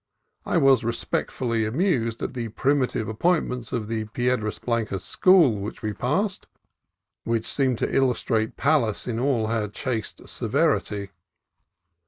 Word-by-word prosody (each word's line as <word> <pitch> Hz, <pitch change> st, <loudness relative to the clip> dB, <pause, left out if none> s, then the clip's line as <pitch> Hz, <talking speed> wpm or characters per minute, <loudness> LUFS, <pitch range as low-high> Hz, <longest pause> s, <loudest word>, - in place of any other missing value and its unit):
I -, -, +2 dB
was 135 Hz, -3 st, +5 dB
respectfully 115 Hz, 0 st, -1 dB
amused 115 Hz, -, 0 dB
at -, -, -3 dB
the 120 Hz, -3 st, -4 dB
primitive 130 Hz, -2 st, 0 dB
appointments 125 Hz, -1 st, 0 dB
of 110 Hz, -4 st, -2 dB
the 110 Hz, -1 st, -2 dB
Piedras 115 Hz, -1 st, -1 dB
Blan 115 Hz, -2 st, -1 dB
cas 95 Hz, -3 st, -4 dB
school, 170 Hz, -, +4 dB
which 100 Hz, +3 st, -6 dB
we 105 Hz, -1 st, -1 dB
passed, 185 Hz, -, -1 dB, 0.8 s
and -, -, -4 dB
which 115 Hz, -1 st, 0 dB
seemed 130 Hz, -4 st, +1 dB
to -, -, -2 dB
illustrate 115 Hz, -4 st, +1 dB
Pallas 135 Hz, -8 st, +1 dB
in 115 Hz, -2 st, -2 dB
all 125 Hz, -4 st, +1 dB
her 110 Hz, -1 st, -1 dB
chaste 110 Hz, +2 st, -4 dB
severity. 100 Hz, -1 st, 0 dB
115 Hz, 140 wpm, -25 LUFS, 110-135 Hz, 0.8 s, was